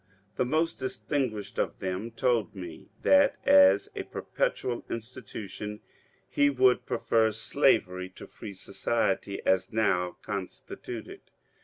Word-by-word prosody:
The 125 - +1
most 160 +5 0
distinguished 120 -4 -2
of - - -1
them 95 +4 -3
told 115 -3 0
me 90 -4 -9
that 285 -1 +5
as 285 0 +6
a - - -2
perpetual 130 - -2
institution 105 -3 -6 0.5
he 145 0 +3
would 130 -2 +3
prefer 110 -1 +2
Slavery 90 -3 +1
to - - -9
Free 100 - -9
Society 100 0 -1
as 95 0 +2
now 90 -5 +1
constituted. 100 -3 -6
110 Hz, 115 wpm, -28 LUFS, 100-130 Hz, 0.5 s, as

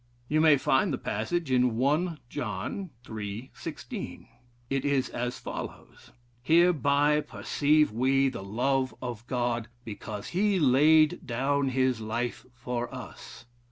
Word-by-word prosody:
You 155 +3 +2
may 155 -2 +6
find 135 +6 +2
the 135 - -1
passage 135 +10 -2
in 125 -2 +3
1 150 +7 +1
John, 180 +7 -4 0.2
iii. 110 +3 -6
16. - - -7 0.4
It 135 +1 -1
is 140 -2 +1
as 125 +1 -3
follows: - - -8 0.3
'Hereby 150 -1 +4
perceive 150 0 +1
we 135 +4 +2
the 130 - -4
love 130 +6 0
of 120 -2 -6
God, 120 -2 -1 0.2
because 105 -1 -6
he 195 +1 +2
laid 155 +4 +5
down 135 +3 +1
his 130 -2 +1
life 115 +3 -3
for 120 -1 -4
us.' 120 - -10
130 Hz, 125 wpm, -28 LUFS, 120-150 Hz, 0.4 s, may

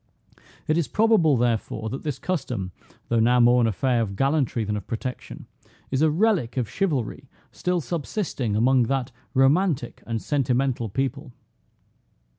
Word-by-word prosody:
It 155 +2 +2
is 160 - 0
probable, 175 - +3
therefore, 115 -2 -1
that 135 - -5
this 150 -4 -3
custom, 125 - -3 0.4
though 115 - +2
now 120 +2 +4
more 120 +1 +5
an 115 - +3
affair 120 +3 +1
of 100 -3 -3
gallantry 135 -2 +1
than 105 0 -2
of 105 - -6
protection, 125 +2 -6 0.5
is 135 +1 0
a 160 - +5
relic 165 - +1
of 125 -4 0
chivalry 135 - -2 0.2
still 180 -1 -1
subsisting 150 - -3
among 125 +3 +3
that 135 -2 -1 0.2
romantic 135 0 +2
and 115 -1 -2
sentimental 130 -3 0
people. 135 +4 -3
130 Hz, 145 wpm, -24 LUFS, 120-150 Hz, 0.5 s, more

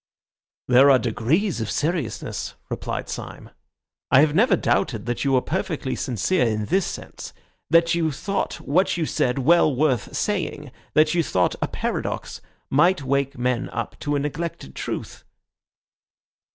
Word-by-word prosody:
"There 130 +3 +6
are 135 - +7
degrees 125 - 0
of 110 - -3
seriousness," 150 -7 -2 0.2
replied - - -4
Syme. - - -8 0.6
"I 130 - +6
have 150 -1 +3
never 205 +3 +4
doubted 115 - 0
that 120 -1 -2
you 140 -1 +1
were 130 - +3
perfectly 160 -6 -2
sincere 130 - 0
in 110 -1 -1
this 190 - +1
sense, - - -8 0.4
that 165 +2 +4
you 165 -2 +1
thought 195 +8 -2
what 175 +5 +1
you 165 - 0
said 125 -3 0
well 155 +1 +4
worth 135 -3 0
saying, 170 -8 -2 0.2
that 155 +1 +4
you 175 - +3
thought 90 - +1
a - - +1
paradox - - -4 0.3
might 170 +2 +3
wake 140 0 0
men 125 0 -1
up 115 -2 -5
to 145 0 -1
a - - +1
neglected 150 - -4
truth." - - -5
145 Hz, 150 wpm, -23 LUFS, 125-170 Hz, 0.6 s, are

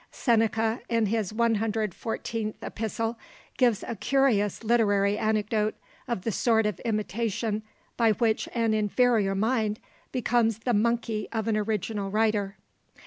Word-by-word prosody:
Seneca, 225 -1 +1
in 230 -2 +2
his 215 -2 -1
114th 220 0 -1
Epistle, 225 +1 -3 0.4
gives 240 -5 +3
a 235 - -3
curious 225 -3 +1
literary 205 -3 +3
anecdote 215 0 0 0.3
of 235 -7 -2
the 225 - -1
sort 225 +1 +2
of 210 -4 -1
imitation 215 0 -2 0.4
by 225 -2 +4
which 220 0 0
an 230 -2 +2
inferior 215 -1 +2
mind 220 0 0 0.3
becomes 235 -3 +1
the 240 +2 -1
monkey 225 0 0
of 225 -1 -2
an 220 - +2
original 210 -1 -2
writer. 210 -1 0
220 Hz, 125 wpm, -27 LUFS, 210-230 Hz, 0.4 s, by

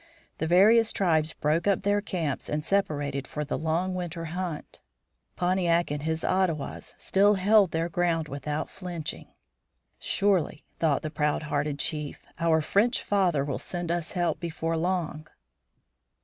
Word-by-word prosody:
The 160 - -1
various 215 +6 +6
tribes 160 -5 +1
broke 155 +5 0
up 200 - +2
their 205 0 +2
camps 170 -8 -3
and 150 +1 -2
separated 145 -8 0
for 150 0 -4
the 145 - -2
long 165 +4 -1
winter 175 -2 -4
hunt. 175 -4 -5 0.6
Pontiac 175 -2 +1
and 145 0 -2
his 160 +1 -2
Ottawas 180 -6 -1
still 205 +2 +3
held 200 0 +5
their 165 +1 -1
ground 170 -2 0
without 150 +2 -3
flinching. 175 -4 -6 0.7
"Surely," 185 -6 +1 0.2
thought 155 -4 +1
the 155 - -3
proud 150 -1 0
hearted 145 -1 -1
chief, 150 0 -4
"our 165 -1 +3
French 210 - +2
father 180 -8 +2
will 140 -2 -3
send 175 -2 -3
us 175 -1 -2
help 175 -2 0
before 165 -1 -2
long." 165 -2 -2
165 Hz, 145 wpm, -27 LUFS, 155-185 Hz, 0.7 s, various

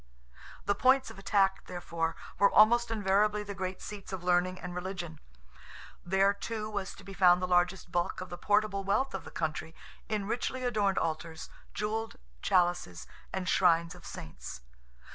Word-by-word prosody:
The 205 - +3
points 260 +4 +3
of - - -12
attack, 195 -1 +2
therefore, 170 -2 -2 0.2
were 200 - +6
almost 235 +2 +5
invariably 210 0 +2
the 205 0 -6
great 185 -1 -4
seats 205 -2 -8
of 190 -2 -5
learning 180 +1 +2
and 180 0 -6
religion. 180 -3 -5 0.8
There, 195 +2 +3
too, 215 +1 -4
was 200 -2 -4
to 200 - -13
be 195 0 -9
found 180 -2 +6
the 185 - -1
largest 180 0 +1
bulk 175 0 0
of 185 - -6
the 175 - -5
portable 205 -1 +2
wealth 260 +8 +1
of - - -5
the - - -8
country, 160 0 -3 0.3
in 210 -2 -1
richly 245 +4 -2
adorned 210 -6 +1
altars, 160 0 -3 0.2
jewelled 220 +1 -2 0.3
chalices, 175 - +1 0.3
and 190 -1 -3
shrines 170 -2 +3
of 180 - -14
saints. - - -8
190 Hz, 160 wpm, -31 LUFS, 175-210 Hz, 0.8 s, were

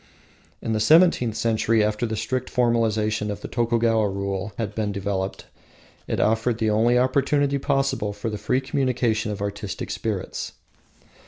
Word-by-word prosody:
In 115 - -1
the 110 - 0
seventeenth 125 -2 +4
century, 110 0 +2
after 105 +3 0
the 110 - -3
strict 130 +3 -2
formalism 110 -3 +1
of 105 0 -5
the - - -5
Tokugawa 115 -2 +1
rule 100 +1 -3
had 110 -3 -3
been 105 -1 -1
developed, 100 -1 -3 0.6
it - - -2
offered 110 +2 +1
the 110 -1 +1
only 115 +3 +3
opportunity 140 +2 +2
possible 135 -6 0
for 105 +2 -4
the 105 - -5
free 125 +5 0
communion 130 -2 -1 0.3
of 105 -2 -4
artistic 100 0 -4
spirits. - - -4
110 Hz, 150 wpm, -24 LUFS, 105-125 Hz, 0.6 s, seventeenth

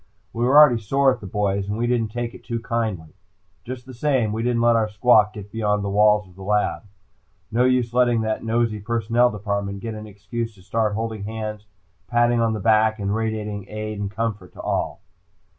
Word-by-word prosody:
We 120 +1 0
were 135 +4 +5
already 130 -7 +7
sore 135 +5 +3
at 125 - -8
the 100 - -7
boys 100 0 -1
and 105 - -2
we 120 - 0
didn't 120 -2 +1
take 120 0 -4
it - - -13
too 115 -1 -3
kindly. 110 -9 -3 0.5
Just 125 +2 -7
the 130 - -10
same, 125 -4 0
we 110 - -2
didn't 120 0 +1
let 120 0 +5
our 110 -1 +1
squawk 105 -1 +4
get 105 -1 -9
beyond 105 -2 0
the 100 - -2
walls 105 0 +4
of 90 - -18
the 95 - -13
lab. 105 +2 0 0.7
No 120 +3 +3
use 125 -2 +1
letting 120 -2 +3
that 110 0 -2
nosy 115 -1 0
Personnel 115 +2 +1
Department 100 -2 -3
get 115 +1 -5
an 110 0 -8
excuse 105 +3 -5
to 95 - -18
start 110 +1 0
holding 110 -2 -4
hands, 105 -1 -5 0.4
patting 120 +2 +2
on 115 -1 +1
the 110 - -3
back, 110 +1 +3
and 100 -1 -2
radiating 105 -2 -3
aid 110 -1 -5
and 100 -1 -2
comfort 105 -3 -4
to - - -16
all. - - -2
110 Hz, 210 wpm, -23 LUFS, 105-120 Hz, 0.7 s, already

